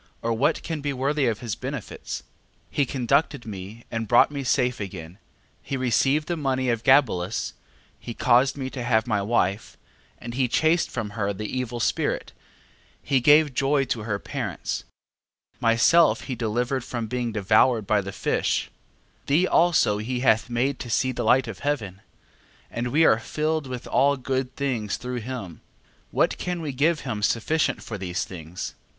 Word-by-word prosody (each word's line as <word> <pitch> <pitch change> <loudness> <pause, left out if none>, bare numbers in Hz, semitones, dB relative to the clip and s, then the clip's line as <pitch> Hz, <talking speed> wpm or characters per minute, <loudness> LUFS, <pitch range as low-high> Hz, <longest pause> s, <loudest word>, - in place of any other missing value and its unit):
or 115 0 +1
what 115 +4 +1
can 160 -3 -4
be 145 0 -1
worthy 140 +1 0
of 115 0 -1
his 115 -3 -3
benefits? 130 -1 -6
12:3. - - -28 0.5
He 145 - +1
conducted 135 +1 0
me 105 +2 -8
and 115 -1 -3
brought 120 +5 +5
me 140 -1 -4
safe 125 -1 +1
again, 90 -2 -7 0.4
he 135 - -4
received 135 +4 +2
the 175 - -1
money 130 -4 0
of 115 -1 -2
Gabelus, 120 -9 +2 0.5
he 115 - -7
caused 130 +3 +3
me 130 -1 -4
to 125 - -5
have 110 -2 +2
my 105 -1 0
wife, 100 -1 0 0.4
and 120 - -8
he 130 0 +1
chased 160 +8 +2
from 105 -2 -4
her 100 -2 -2
the 105 +2 -6
evil 125 -2 -3
spirit, - - -1 0.7
he 135 - +1
gave 150 +2 +5
joy 135 +1 +2
to 120 - -2
her 105 -1 -2
parents, - - -4 0.7
myself 125 +9 +4
he 135 - -5
delivered 120 +3 -1
from 120 -2 -4
being 120 0 -2
devoured 110 +2 +3
by 105 +1 +2
the 100 0 -6
fish, 95 - -1 0.6
thee 155 +6 +3
also 165 - +3
he 125 +3 -3
hath 110 -2 +3
made 125 +4 0
to 120 - -6
see 130 +3 +1
the 125 - -3
light 130 -1 +4
of 115 - -7
heaven, 110 -10 -3 0.7
and 120 +1 -2
we 150 +6 +3
are 110 - +5
filled 155 +4 -2
with 125 -2 -6
all 140 +1 +3
good 130 0 -2
things 120 -7 -2
through 125 0 -4
him. 115 -8 -7 0.5
What - - +1
can 180 -1 -3
we 155 -3 -3
give 150 +5 +1
him 115 -6 -4
sufficient 120 +9 +1
for 105 -3 -6
these 90 -1 -2
things? 85 0 -7
125 Hz, 170 wpm, -25 LUFS, 110-140 Hz, 0.7 s, brought